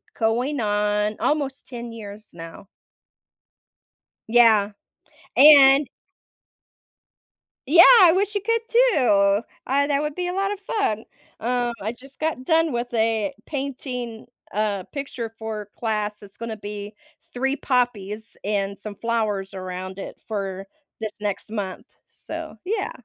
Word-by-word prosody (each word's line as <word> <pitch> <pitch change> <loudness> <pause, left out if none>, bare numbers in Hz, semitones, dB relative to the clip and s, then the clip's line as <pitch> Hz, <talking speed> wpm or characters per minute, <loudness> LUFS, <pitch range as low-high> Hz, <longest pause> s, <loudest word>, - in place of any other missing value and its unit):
going 245 +5 0
on 210 0 +1
almost 285 -2 -1
10 240 -2 -7
years 210 -1 -10
now. 165 +4 -10 1.6
Yeah. 220 -3 +5 0.7
And 280 -1 +8 1.8
Yeah, 345 +3 +9 0.2
I 345 -3 +8
wish 400 +3 0
you 410 - 0
could, 460 +3 +1
too. 225 - +4 0.3
I 280 +2 +2
that 285 -1 +1
would 300 -1 -3
be 360 0 -2
a 360 - -3
lot 395 +1 0
of 405 - -8
fun, 400 - -1 0.4
um, 240 0 0
I 215 - -2
just 260 +3 -15
got 310 -5 -2
done 325 -2 +3
with 240 +1 -3
a 225 +3 +1
painting, 255 -5 -5 0.3
uh, 205 -2 0
picture 275 -5 -5
for 215 -2 -5
class. 210 -2 -2
It's 200 - -15
gonna 230 -1 -5
be 205 0 -7 0.4
3 270 +3 0
poppies 225 -4 -1
and 200 -1 -1
some 205 0 -7
flowers 215 -4 -1
around 185 0 -6
it - - -8
for 195 -3 -4 0.4
this 220 -1 -3
next 205 0 -4
month, 205 +2 -5 0.2
so - - -8
yeah. 400 +2 -2
230 Hz, 130 wpm, -23 LUFS, 210-280 Hz, 1.8 s, Yeah